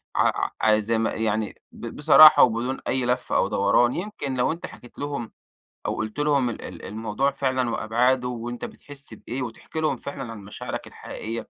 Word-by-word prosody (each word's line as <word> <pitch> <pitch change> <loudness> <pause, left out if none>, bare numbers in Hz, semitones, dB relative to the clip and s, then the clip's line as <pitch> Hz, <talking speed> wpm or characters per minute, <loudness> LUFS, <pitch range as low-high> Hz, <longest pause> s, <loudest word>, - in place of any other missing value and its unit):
ع - - +2
ع 110 0 +5
زي 115 +2 0
ما 110 0 0
يعني 110 -1 -2
ب 115 - -8
بصراحة 155 +1 +8
وبدون 120 +3 +1
أي 130 -1 0
لف 125 +1 -1
أو - - +3
دوران، 100 +5 +3
يمكن 175 -8 -4
لو 125 +4 +1
أنت 165 +2 -5
حكيت 120 - -13
لهم 140 -5 -4 0.5
أو - - -1
قُلت 110 +5 -4
لهم 145 -4 +2
ال 115 - -6
ال 90 -2 -9
الموضوع 110 +6 -1
فعلًا 130 -2 0
وأبعادُه 125 +3 +1
وأنت 120 0 -5
بتحس 140 -4 -10
بإيه 120 +4 -6
وتحكي 125 +6 -6
لهم 155 -1 0
فعلًا 125 -4 -6
عن 115 - -8
مشاعرك 120 +4 -6
الحقيقية، 115 +1 -7
125 Hz, 180 wpm, -24 LUFS, 110-135 Hz, 0.5 s, بصراحة